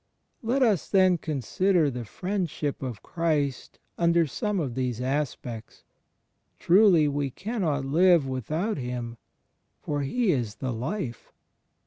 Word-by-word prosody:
Let 255 +4 +1
us 210 -9 +2
then 185 -3 +4
consider 155 - +1
the 120 -2 -5
Friendship 175 - -3
of 125 -5 -5
Christ 150 -5 -1 0.2
under 170 -1 +4
some 210 - -2
of 135 -7 -2
these 125 -2 -2
aspects. 125 -4 -4 0.7
Truly 180 -4 +5
we 145 -1 -1
cannot 170 - -2
live 170 +2 +4
without 155 - -2
Him, 120 -2 -5 0.6
for 145 -1 -2
He 210 - +1
is 120 -8 -1
the 130 -2 -3
Life. 125 - -4
150 Hz, 120 wpm, -26 LUFS, 130-185 Hz, 0.7 s, Truly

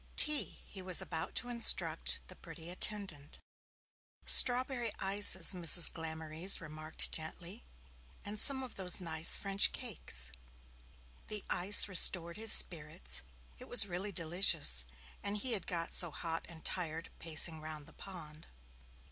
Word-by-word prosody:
'Tea,' 300 -1 -1
he 195 - -12
was 185 -2 +1
about 160 - -6
to 245 - -3
instruct 235 -1 0
the - - -12
pretty 170 0 -13
attendant. 185 -7 -6 0.9
'Strawberry 245 -2 +1
ices,' 195 -2 +1
Mrs. 175 -1 +7
Glamorys 160 +2 -4
remarked 155 -1 -5
gently. 170 +6 -6 0.6
'And 205 +1 -6
some 265 +2 +4
of 255 - -12
those 180 -2 +2
nice 160 -2 +3
French 200 0 0
cakes.' 110 - -7 1.0
The 210 -2 -5
ice 195 +4 +4
restored 170 -2 +3
his 225 0 +6
spirits, 150 - +3 0.4
it - - -15
was 245 -4 -1
really 190 +2 -8
delicious, 165 - -1 0.4
and 200 +1 -6
he 250 +4 -1
had 200 -5 -4
got 170 -2 -6
so 175 - +5
hot 165 +2 -8
and 165 -2 -16
tired, 165 -2 -7
pacing 160 0 +1
round 155 -1 -12
the - - -19
pond. 160 -5 -14
175 Hz, 135 wpm, -31 LUFS, 160-205 Hz, 1.0 s, Mrs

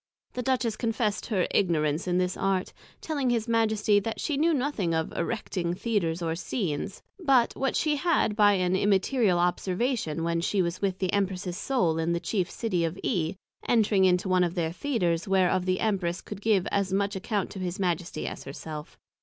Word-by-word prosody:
The 250 - -3
Duchess 245 -3 0
confessed 225 -3 -1
her 195 -6 +1
Ignorance 160 -3 +1
in 180 0 +1
this 180 0 0
Art, 195 -1 -1 0.3
telling 285 -5 -1
his 235 -1 0
Majesty 220 -2 +3
that 225 +3 -4
she 300 - -1
knew 320 +4 +3
nothing 250 - 0
of 160 0 -2
erecting 175 -2 -2
Theatres 180 -6 -1
or 165 -1 0
Scenes, 180 - -3 0.2
but 270 -9 +3
what 270 -1 -1
she 300 -2 +1
had 315 -9 +1
by 205 -1 +5
an 185 -1 +1
Immaterial 200 +1 +2
Observation, 180 - 0
when 170 0 0
she 195 +3 0
was 170 +1 -3
with 195 -2 0
the 185 -1 -1
Empress's 190 -3 -1
Soul 175 -12 +1
in 165 +1 0
the 170 - 0
chief 180 +1 -1
City 185 -7 -1
of 165 +2 -2
E. 175 -5 0 0.3
Entring 210 -4 +4
into 180 +1 +2
one 185 -1 +3
of 175 0 -1
their 165 -3 0
Theatres, 175 - -1
whereof 185 -1 +2
the 185 0 +1
Empress 185 -5 0
could 205 -1 -8
give 205 -4 +2
as 200 -2 0
much 200 +1 0
account 195 +1 -2
to 195 - -7
his 180 -1 -3
Majesty, 175 -1 -2
as - - -5
her 135 - -7
self. 150 -1 -8
190 Hz, 190 wpm, -27 LUFS, 175-225 Hz, 0.3 s, by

